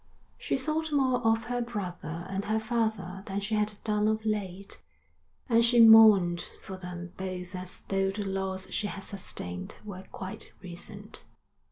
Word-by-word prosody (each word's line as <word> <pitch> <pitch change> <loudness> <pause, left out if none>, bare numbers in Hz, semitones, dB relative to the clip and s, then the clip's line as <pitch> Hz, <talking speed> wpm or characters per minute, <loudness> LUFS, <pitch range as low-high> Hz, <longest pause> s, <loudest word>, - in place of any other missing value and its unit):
She - - 0
thought 310 +3 -1
more 260 -3 +3
of 225 -1 +2
her 245 0 -2
brother 180 -7 -5
and 195 +1 -3
her 220 +1 +1
father 220 -5 -1
than 195 0 -2
she 205 +2 -4
had 210 0 +1
done 210 -1 +1
of 220 0 0
late, 200 - -3 0.7
and 230 -1 +4
she 235 +1 +4
mourned 215 -6 +8 0.2
for 190 - -6
them 180 -1 -7
both 185 -1 -5
as 185 0 -6
though 195 0 0
the 205 +2 -3
loss 190 -1 -2
she 205 - -1
had 195 0 -6
sustained 90 - -6
were 190 -3 -7
quite 190 +3 -5
recent. 200 +4 -8
200 Hz, 160 wpm, -29 LUFS, 185-220 Hz, 0.7 s, mourned